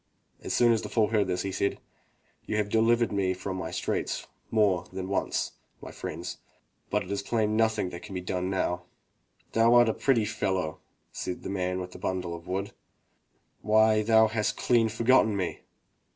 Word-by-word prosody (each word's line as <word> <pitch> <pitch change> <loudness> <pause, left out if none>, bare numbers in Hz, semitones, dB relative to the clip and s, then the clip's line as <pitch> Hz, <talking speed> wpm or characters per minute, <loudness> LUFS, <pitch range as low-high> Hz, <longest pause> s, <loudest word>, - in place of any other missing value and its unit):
As - - -5
soon 120 -1 +4
as 115 -1 +2
the - - -6
fool 110 -3 +2
heard 105 -3 +2
this, 90 -1 -1
he 100 - -3
said: 100 +1 -1 0.7
"You 105 - -1
have 105 -1 0
delivered 115 +2 +3
me 95 -2 0
from 95 +1 -5
my - - -4
straits - - -2 0.2
more 100 -6 +2
than 95 0 -5
once, 100 - -1 0.3
my - - -9
friends, - - -6 0.5
but 105 0 0
it 95 - -9
is 100 0 -1
plain 110 0 0
that 110 - 0
nothing 110 -5 0
can 90 +3 -8
be - - -1
done 90 0 -2
now." 90 -2 -1 0.7
"Thou 115 +1 +4
art 120 -1 +6
a - - +1
pretty 125 -6 +2
fellow," 95 -6 -2 0.3
said 90 - -5
the - - -4
man 90 -1 -1
with 90 0 -6
the - - -11
bimdle 90 -2 -2
of 85 +1 -9
wood. 95 +2 -2 0.9
"Why, 110 0 +4
thou 110 +1 +5
hast 110 -1 -1
clean 115 -2 +3
forgotten 115 -1 +3
me!" 95 -2 -2
100 Hz, 185 wpm, -28 LUFS, 95-110 Hz, 0.9 s, art